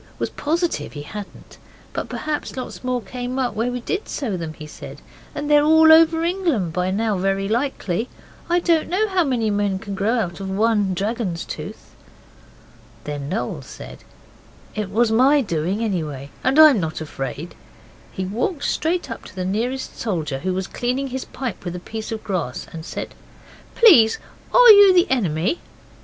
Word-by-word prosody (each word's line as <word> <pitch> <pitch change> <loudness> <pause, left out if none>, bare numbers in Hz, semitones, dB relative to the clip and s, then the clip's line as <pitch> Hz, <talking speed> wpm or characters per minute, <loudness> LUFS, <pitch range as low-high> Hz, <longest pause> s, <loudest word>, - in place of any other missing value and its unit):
was - - -3
positive 330 +3 -2
he 145 -2 -7
hadn't. 205 +6 -10 0.3
'But - - -4
perhaps 300 -3 -4
lots 255 - -6
more 250 -2 -1
came 250 +1 -5
up 255 -4 0
where 225 +3 -1
we 245 0 -4
did 395 - -3
sow 235 -10 -3
them,' 165 -3 -5
he 155 - -9
said; 150 - -10 0.4
'they're 295 0 +3
all 320 +1 +6
over 325 0 +6
England 335 - 0
by 180 +1 0
now 210 0 0
very 195 +1 0
likely. 230 -3 -1 0.4
I 350 +1 +3
don't 335 -2 +2
know 410 +5 +1
how 375 -2 +2
many 240 -7 0
men 205 -1 0
can 200 +1 -7
grow 205 +3 0
out 180 -6 -2
of 195 -1 -5
one 205 -1 +1
dragon's 200 -3 -2
tooth.' - - -8 1.1
Then 145 -1 -5
Noel 205 +7 -3
said, - - -11 0.7
'It 210 -3 -3
was 220 +3 +2
my 265 +6 +5
doing 185 - -1
anyhow, 155 -10 -3
and 265 +3 +2
I'm 310 -7 +8
not 160 -3 -3
afraid,' 135 -4 -5
and 165 +4 -8 0.6
he 190 - -4
walked 250 - -2
straight 330 -4 -1
up 230 - -7
to - - -13
the 185 -1 -3
nearest 240 +7 -3
soldier, 160 -11 -2
who 185 +4 -2
was 190 0 -2
cleaning 255 +6 -2
his 260 +1 -4
pipe 255 -5 -6
with 175 -1 -5
a - - -5
piece 220 +4 -7
of 220 -1 -5
grass, 175 -11 -3
and 160 -1 -7
said - - -6 0.6
'Please, 290 - +7 0.3
are - - +9
you 405 -2 +8
the 350 0 +6
enemy? 195 - 0
225 Hz, 175 wpm, -21 LUFS, 185-280 Hz, 1.1 s, are